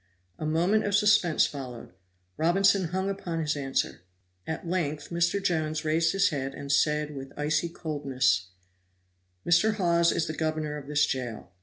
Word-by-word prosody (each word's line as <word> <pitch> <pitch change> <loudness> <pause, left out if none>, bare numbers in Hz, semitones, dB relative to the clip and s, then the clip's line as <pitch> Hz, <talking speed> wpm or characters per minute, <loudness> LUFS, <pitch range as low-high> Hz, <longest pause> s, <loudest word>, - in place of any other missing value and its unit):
A 155 - -2
moment 175 +8 +2
of 205 -1 0
suspense 205 -6 +4
followed 125 -8 -7 0.4
Robinson 195 +3 +3
hung 190 +3 -2
upon 180 -4 -3
his 150 -2 0
answer. 135 - -2 0.5
At 160 +2 -4
length 155 -4 -2
Mr. 170 +3 +1
Jones 155 -4 -1
raised 160 +1 +2
his 195 0 +3
head 135 -4 -4
and 140 0 -5
said, 150 +1 +1
with 135 0 -8
icy 155 +3 0
coldness: 135 - 0 1.0
"Mr. 215 +6 +3
Hawes 170 -3 +3
is 165 - 0
the 155 - -4
governor 155 -1 -2
of 145 -2 -8
this 150 0 +3
jail. 125 -5 -4
155 Hz, 155 wpm, -27 LUFS, 145-175 Hz, 1.0 s, suspense